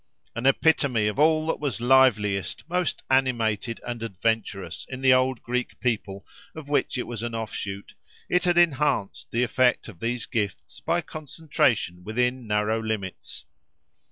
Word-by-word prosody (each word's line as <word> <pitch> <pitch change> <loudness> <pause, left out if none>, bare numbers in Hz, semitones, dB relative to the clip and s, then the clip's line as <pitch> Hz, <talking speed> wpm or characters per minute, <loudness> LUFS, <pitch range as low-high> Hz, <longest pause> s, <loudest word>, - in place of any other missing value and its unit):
An 120 +3 0
epitome 135 -6 +3
of 105 +5 -1
all 155 +1 +4
that 165 - -1
was 140 -5 -2
liveliest, 120 -5 +3
most 180 0 -1
animated 115 -4 +1
and 120 -1 -5
adventurous, 100 -6 -2
in 130 0 -6
the 130 -1 +6
old 130 -1 +1
Greek 125 +1 -3
people 105 -5 -2 0.3
of 155 -3 -8
which 145 -2 0
it 125 - -2
was 115 -3 -5
an 120 -1 -3
offshoot, 100 -3 -5 0.3
it 180 +1 +1
had 175 -1 +2
enhanced 150 - +1
the 120 +2 +1
effect 125 +1 +2
of 100 -7 -11
these 120 +2 -2
gifts 100 - -3
by 175 - 0
concentration 140 - -1
within 125 +3 -1
narrow 105 +1 +1
limits. 110 -4 -5
120 Hz, 150 wpm, -25 LUFS, 105-135 Hz, 0.3 s, the